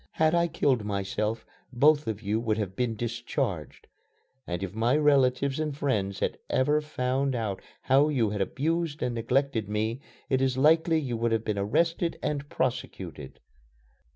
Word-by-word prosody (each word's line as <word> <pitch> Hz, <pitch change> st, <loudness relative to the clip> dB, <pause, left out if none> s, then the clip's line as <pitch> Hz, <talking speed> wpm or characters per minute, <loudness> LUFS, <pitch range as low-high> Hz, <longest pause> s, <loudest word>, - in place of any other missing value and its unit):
Had 160 Hz, 0 st, +2 dB
I 170 Hz, 0 st, +3 dB
killed 135 Hz, -8 st, +1 dB
myself, 105 Hz, +2 st, -2 dB, 0.3 s
both 145 Hz, +4 st, +4 dB
of 110 Hz, 0 st, -3 dB
you 105 Hz, +2 st, 0 dB
would 110 Hz, -2 st, 0 dB
have 100 Hz, -3 st, -3 dB
been 120 Hz, -1 st, -1 dB
discharged. 120 Hz, -, -3 dB, 0.6 s
And 85 Hz, +2 st, -3 dB
if 95 Hz, -1 st, -4 dB
my 115 Hz, +6 st, +2 dB
relatives 140 Hz, -2 st, +3 dB
and 150 Hz, -3 st, -2 dB
friends 100 Hz, -9 st, -1 dB
had -, -, -1 dB
ever 145 Hz, +4 st, +2 dB
found 135 Hz, -2 st, -1 dB
out 110 Hz, -5 st, -3 dB, 0.2 s
how 140 Hz, +3 st, +4 dB
you 120 Hz, -8 st, +1 dB
had 105 Hz, -1 st, -2 dB
abused 155 Hz, -, -1 dB
and 125 Hz, -, -1 dB
neglected 120 Hz, -1 st, 0 dB
me, 110 Hz, +4 st, -1 dB, 0.3 s
it 130 Hz, -1 st, +1 dB
is 130 Hz, -1 st, +1 dB
likely 160 Hz, +3 st, +4 dB
you 125 Hz, -6 st, -3 dB
would 115 Hz, 0 st, 0 dB
have 115 Hz, -1 st, 0 dB
been 105 Hz, -2 st, -1 dB
arrested 165 Hz, -, +1 dB
and 145 Hz, -1 st, -2 dB
prosecuted." 95 Hz, -, -4 dB
125 Hz, 160 wpm, -28 LUFS, 110-145 Hz, 0.6 s, both